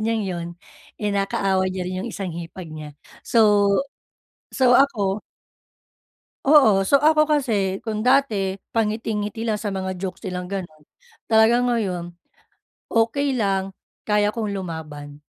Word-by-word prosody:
niyang 220 -1 0
yun 175 -3 -4 0.5
eh, 210 -1 -2
nakaaway 195 -1 0
niya 185 -1 -4
rin 185 0 -4
yung 205 - -4
isang 195 -5 -5
hipag 170 0 -8
niya. 150 -2 -9 0.2
So 210 -3 +4 0.9
so 250 -2 +5
ako 210 -7 +1 1.2
Oo. 220 -10 +5
So, 280 +5 +4
ako 305 0 +5
kasi 215 -11 0
kung 220 +1 -3
dati 220 -8 +2 0.2
pangiti-ngiti 220 0 -2
lang 220 -2 -1
sa 205 -2 -4
mga 190 -1 -4
jokes 185 -1 -6
nilang 180 0 -4
ganun, 180 -5 -6 0.4
talagang 230 +2 +4
ngayon, 185 -8 -2 0.8
okey 250 +5 +1
lang 195 -2 0 0.3
kaya 210 -1 +2
kong 215 -1 -3
lumaban, 150 -6 -7
200 Hz, 130 wpm, -22 LUFS, 185-225 Hz, 1.2 s, so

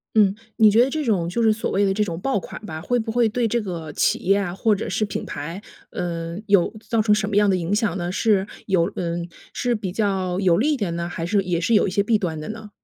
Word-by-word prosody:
嗯。 205 -3 +5 0.2
你 215 -1 +6
觉 225 +3 +5
得 - - -1
这 310 +1 -2
种 190 -9 +1
就 230 +7 -1
是 220 -1 +5
所 220 - -2
谓 200 - +2
的 195 - +2
这 210 +2 0
种 170 -4 -4
爆 270 +2 0
款 - - -8
吧， 160 -6 -6
会 245 +8 0
不 225 -1 -3
会 240 -1 +3
对 235 +2 0
这 235 +2 0
个 170 -7 -5
企 - - +1
业 195 +2 +3
啊 185 -3 -2
或 215 +2 +2
者 - - -4
是 215 +3 0
品 205 - -4
牌， 165 +6 -6 0.3
呃， 170 -1 -4
有 200 -4 +3 0.2
造 230 -2 +2
成 210 -1 +4
什 210 -1 -1
么 205 - -2
样 205 0 +5
的 185 - +2
影 175 +3 -1
响 210 -5 0
呢？ 175 0 -2
是 205 -2 +2 0.2
有 185 -2 +2
嗯， 170 0 -3 0.2
是 245 -1 0
比 210 -4 -3
较 190 -3 0
有 180 -3 +4
利 290 +8 +2
一 - - +1
点 200 -9 -2
呢？ 170 0 -3
还 170 -1 -4
是 200 +2 +2
也 175 -2 -1
是 220 +7 +1
有 - - +4
一 - - -2
些 200 +2 +2
弊 215 +1 +2
端 170 -6 -3
的 155 - -6
呢？ 220 -1 -8
200 Hz, 295 characters per minute, -22 LUFS, 175-220 Hz, 0.3 s, 你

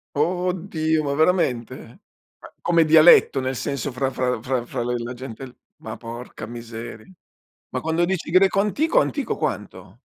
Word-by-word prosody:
Oddio 165 -1 0
ma 140 0 -1
veramente? 155 -7 +1 0.6
Ma - - -14
come 170 -1 +3
dialetto 155 -3 +6
nel 130 0 -2
senso 140 +3 -3
fra 130 +1 -1
fra 125 -3 -1
fra 125 0 -2
fra 120 -1 -4
le 125 +1 -2
la 120 +2 -5
gente 130 +1 -8
l 125 - -15 0.3
ma 110 0 -6
porca 120 +2 -8
miseria. 115 -1 -9 0.6
Ma - - -4
quando 160 +2 +1
dici 180 -3 -3
greco 190 +2 +4
antico, 310 - +2
antico - - -2
quanto? - - -5
140 Hz, 155 wpm, -22 LUFS, 120-170 Hz, 0.6 s, dialetto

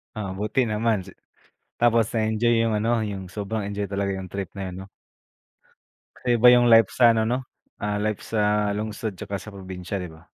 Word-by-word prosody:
Ah, 100 -4 -4
buti 105 +5 0
naman 105 -3 0
si 95 - -13 0.7
tapos 115 -2 +4
na-enjoy 110 +1 +1
yung 115 - 0
ano, 115 +2 +1
yung 100 -2 -5
sobrang 100 +1 -4
enjoy 100 0 -3
talaga 100 0 -1
yung 95 -1 -7
trip 100 -2 -4
na 100 - -4
yun 90 - -8
'no. - - -14 1.3
Kaya 120 -1 0
iba 120 +1 +5
yung 120 0 +5
life 115 -3 +6
sa 120 -2 +5
ano 110 - +2
'no, 120 +3 0 0.4
ah, 105 0 -2
life 110 -1 -1
sa 105 -1 +1
lungsod 110 0 -4
tsaka 100 +2 -5
sa 105 - -10
probinsya 95 0 -6
di 90 -2 -7
ba? 80 0 -15
105 Hz, 190 wpm, -24 LUFS, 100-115 Hz, 1.3 s, life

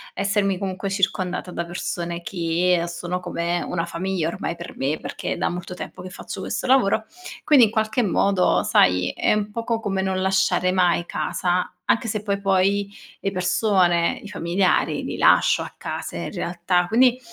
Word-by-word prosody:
essermi, 195 -1 +1
comunque, 195 0 -3
circondata 185 -2 -1
da 170 - -3
persone 170 -1 -4
che 175 -2 +1
sono 175 +1 -4
come 175 -1 -2
una 165 -1 -2
famiglia 170 -1 -2
ormai 170 - -4
per 170 - -9
me, 140 +4 -1
perché - - -4
è - - -6
da - - 0
molto 180 +1 -6
tempo 180 - -8
che 185 - -8
faccio - - -8
questo - - -3
lavoro. 250 -5 +3 0.4
Quindi, 270 -6 +6
in 210 - -3
qualche 220 +2 0
modo, 195 -2 +2
sai, 90 0 +3
è - - +2
un 210 0 -1
poco 230 0 -2
come 195 -3 -1
non 190 0 -1
lasciare 190 -1 +2
mai 175 -2 +2
casa, 180 +1 -1
anche 230 0 +1
se 215 -1 -2
poi 200 -1 -1
poi 195 +1 +2 0.3
le 195 - -1
persone, 180 -2 +2
i - - -8
familiari, 180 0 0
li - - -4
lascio - - +4
a - - -6
casa - - -5
in - - -4
realtà. 175 -1 0
Quindi 250 +3 +4
185 Hz, 175 wpm, -23 LUFS, 175-200 Hz, 0.4 s, Quindi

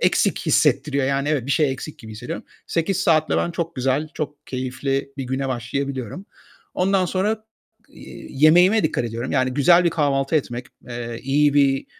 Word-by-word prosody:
eksik - - +2
hissettiriyor. 140 -1 +2
Yani 140 +1 0
evet, 145 -5 0
bir - - -3
şey 145 -1 +2
eksik 140 +3 -8
gibi 110 -1 -10
hissediyorum. 105 - -6 0.2
8 170 +3 0
saatle 155 -2 +2
ben 175 - 0
çok 170 -1 -4
güzel, 135 +4 0
çok 150 -1 -6
keyifli 135 +2 -3
bir 135 - -4
güne 130 +2 -2
başlayabiliyorum. 130 - -4 0.5
Ondan 185 0 +2
sonra, 210 +5 -1 0.4
iii, - - -12 0.2
yemeğime 180 +7 +6
dikkat 155 -6 0
ediyorum. 115 +2 -4
Yani, 130 -2 +1
güzel 170 +6 +5
bir 170 - +3
kahvaltı 145 -2 +1
etmek, 125 -4 -3 0.2
eee, 120 -1 -5
iyi 145 +2 +2
bir, 135 -2 +3
140 Hz, 165 wpm, -22 LUFS, 130-160 Hz, 0.5 s, yemeğime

